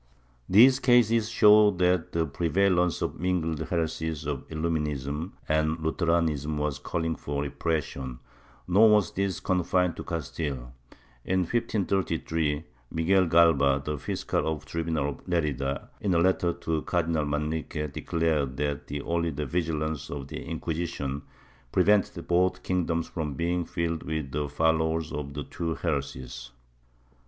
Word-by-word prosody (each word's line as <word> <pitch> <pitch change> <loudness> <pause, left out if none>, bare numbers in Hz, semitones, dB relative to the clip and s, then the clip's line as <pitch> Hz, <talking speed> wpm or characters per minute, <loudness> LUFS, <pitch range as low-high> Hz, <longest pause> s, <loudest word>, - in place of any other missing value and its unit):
These 125 +7 +7
cases 115 -3 +4
show 105 -2 +7
that 90 -3 +1
the 85 -1 +1
prevalence 90 +3 +1
of - - -1
the - - -15
mingled 85 -3 0
heresies 80 -2 -2
of 70 -3 -4
Illuminism 75 -1 -2
and 80 +1 +1
Lutheranism 80 -2 0
was 75 -1 -1
calling 80 +2 -2
for 70 -1 -3
repression, 70 -3 -3 0.5
nor 105 +5 +6
was 105 -4 +4
this 95 -1 -1
confined 90 -1 +1
to - - -5
Castile. 70 -6 -4 0.5
In 95 0 +1
1533, 85 -7 0 0.3
Miguel 90 +3 +2
Galba, 75 -5 +5 0.2
fiscal - - -2
of 75 -2 -4
the - - -19
tribunal 80 -3 -1
of 70 - -9
Lerida, 70 -6 -1
in 95 -4 0
a - - +4
letter 90 0 +2
to 80 -2 -2
Cardinal 80 -3 0
Manrique, 75 0 -2
declared 75 -6 0
that 70 -2 -3
only 85 0 0
the 75 -1 -3
vigilance 80 -1 -2
of 70 -1 -6
the - - -6
Inquisition 80 -4 -3 0.5
prevented 95 -2 +2
both 90 +1 +2
kingdoms 85 -2 0
from 75 -5 -4
being 85 +2 0
filled 85 -2 -2
with 80 -4 -4
the 75 +1 -2
followers 80 +1 +1
of 70 -1 -5
the 75 - -3
two 85 +2 -3
heresies. 70 -5 -4
80 Hz, 135 wpm, -27 LUFS, 75-90 Hz, 0.5 s, These